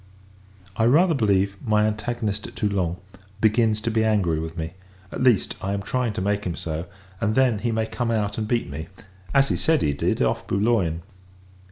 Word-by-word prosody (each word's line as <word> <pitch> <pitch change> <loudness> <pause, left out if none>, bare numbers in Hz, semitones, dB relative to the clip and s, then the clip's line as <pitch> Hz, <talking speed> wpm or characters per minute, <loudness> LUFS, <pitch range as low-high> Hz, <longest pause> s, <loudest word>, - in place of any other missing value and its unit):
I 115 - +3
rather 165 +8 +5
believe, 100 -6 +1
my 105 -3 +3
antagonist 110 -1 -2
at - - -13
Toulon, 95 -5 -1 0.4
begins 110 0 +3
to 115 - -1
be 110 0 +2
angry 100 -8 +2
with 80 +1 -6
me: 80 0 -4 0.4
at - - -5
least, 125 -7 +3
I 100 +1 -2
am 100 0 -3
trying 125 0 -1
to 110 - -3
make 100 +1 0
him 85 -2 -3
so; 80 +1 -4 0.3
and 110 -1 0
then, 125 -5 +3
he 120 +2 -1
may 110 0 0
come 120 +1 -3
out, 105 -2 -1
and 110 - -2
beat 120 0 0
me, 80 +3 -6 0.4
as 135 0 +4
he - - +1
says 160 -2 +2
he 70 - +1
did, 70 - 0
off - - 0
Boulogne. 95 -6 +1
105 Hz, 195 wpm, -24 LUFS, 95-115 Hz, 0.4 s, rather